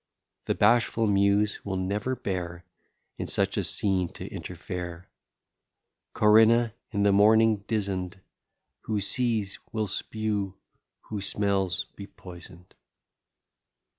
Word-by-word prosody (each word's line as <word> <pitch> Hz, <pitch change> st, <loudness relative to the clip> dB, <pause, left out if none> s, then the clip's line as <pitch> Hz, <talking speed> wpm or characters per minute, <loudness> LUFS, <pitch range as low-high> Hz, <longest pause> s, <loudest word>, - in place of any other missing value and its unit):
The -, -, 0 dB
bashful 115 Hz, +1 st, +3 dB
Muse 100 Hz, +1 st, +2 dB
will 95 Hz, -2 st, -3 dB
never 100 Hz, +7 st, -1 dB
bear 90 Hz, -6 st, -4 dB, 0.5 s
In -, -, -3 dB
such -, -, 0 dB
a -, -, 0 dB
scene 95 Hz, -4 st, +1 dB
to -, -, -8 dB
interfere. 90 Hz, 0 st, -7 dB, 1.1 s
Corinna, 110 Hz, +2 st, +5 dB, 0.2 s
in 100 Hz, -2 st, -1 dB
the 100 Hz, -, +4 dB
morning 110 Hz, +2 st, +5 dB
dizen'd, 95 Hz, -4 st, -2 dB, 0.7 s
Who 110 Hz, -2 st, -1 dB
sees, 110 Hz, -1 st, 0 dB
will 110 Hz, -1 st, -1 dB
spew; 105 Hz, -1 st, -2 dB, 0.5 s
who 105 Hz, -2 st, -6 dB
smells, 95 Hz, -3 st, 0 dB
be 100 Hz, -, -9 dB
poison'd. 90 Hz, -2 st, -13 dB
100 Hz, 105 wpm, -27 LUFS, 95-110 Hz, 1.1 s, Corinna